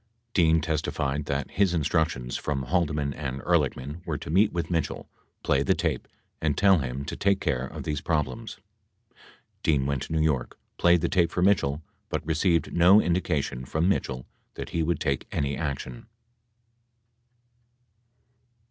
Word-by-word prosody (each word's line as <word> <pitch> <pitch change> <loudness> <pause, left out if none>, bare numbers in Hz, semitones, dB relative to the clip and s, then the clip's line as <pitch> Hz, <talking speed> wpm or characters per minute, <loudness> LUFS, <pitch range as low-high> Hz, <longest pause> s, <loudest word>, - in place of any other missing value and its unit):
Dean 80 -3 +4
testified 75 -2 -1
that 70 0 -2
his 95 -3 +2
in 80 - +1
structions 70 -6 0
from 70 -3 -2
Haldeman 75 -2 0
and 70 -3 -4
Ehrlichman 75 -1 0
were - - -3
to - - -7
meet 100 +5 +4
with 85 0 -3
Mitchell, 80 -2 -2 0.4
play 70 -1 +2
the 95 +6 +2
tape, 80 -6 -2 0.3
and 75 -2 0
tell 95 -2 +5
him 65 0 -4
to - - -5
take 100 0 +2
care 65 -7 -1
of - - -8
these 75 -1 -2
problems. 75 -7 -2 0.6
2 - - -36 0.5
Dean 70 -4 +2
went 70 -2 -1
to - - -6
New 80 - +1
York, 70 -6 -1 0.2
played 85 -1 +5
the - - +1
tape 85 -2 +2
for 90 - -1
Mitchell, 80 -6 +2 0.3
but - - -3
received 85 +2 +1
no 90 +4 +7
indication 80 - 0
from 80 +6 0
Mitchell 65 -9 -1 0.3
that - - -6
he 85 - -1
would 80 -1 0
take 70 -1 -1
any 70 0 -1
action. 70 - -5
75 Hz, 160 wpm, -27 LUFS, 70-85 Hz, 0.6 s, no